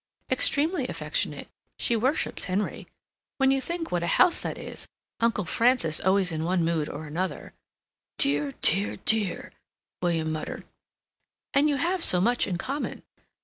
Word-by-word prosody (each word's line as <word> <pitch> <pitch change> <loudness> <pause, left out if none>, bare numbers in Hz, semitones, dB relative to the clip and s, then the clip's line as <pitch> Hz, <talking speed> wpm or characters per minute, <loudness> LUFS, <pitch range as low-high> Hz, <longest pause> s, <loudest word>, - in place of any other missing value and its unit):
"Extremely 315 +6 +1
affectionate. - - -3 0.3
She 235 - +1
worships 255 +7 0
Henry. 195 +3 -2 0.5
When 270 -1 +4
you 270 0 +2
think 340 +3 -4
what 175 - 0
a 170 - -2
house 360 - +4
that - - -4
is—Uncle 230 -4 -4
Francis 230 -5 +2
always 190 -1 +2
in 160 -1 -2
one 175 0 +1
mood 165 -3 0
or 155 +2 -6
another—" 165 +3 -4 0.6
"Dear, 145 0 +1
dear, 195 +5 +4
dear," 215 -4 +1 0.5
William 165 -3 0
muttered. 155 0 -5 0.9
"And 285 +2 +4
you 290 - +1
have 345 +5 0
so 180 - +5
much 240 +6 +2
in 180 -3 -2
common." 275 +10 -4
195 Hz, 145 wpm, -26 LUFS, 165-270 Hz, 0.9 s, so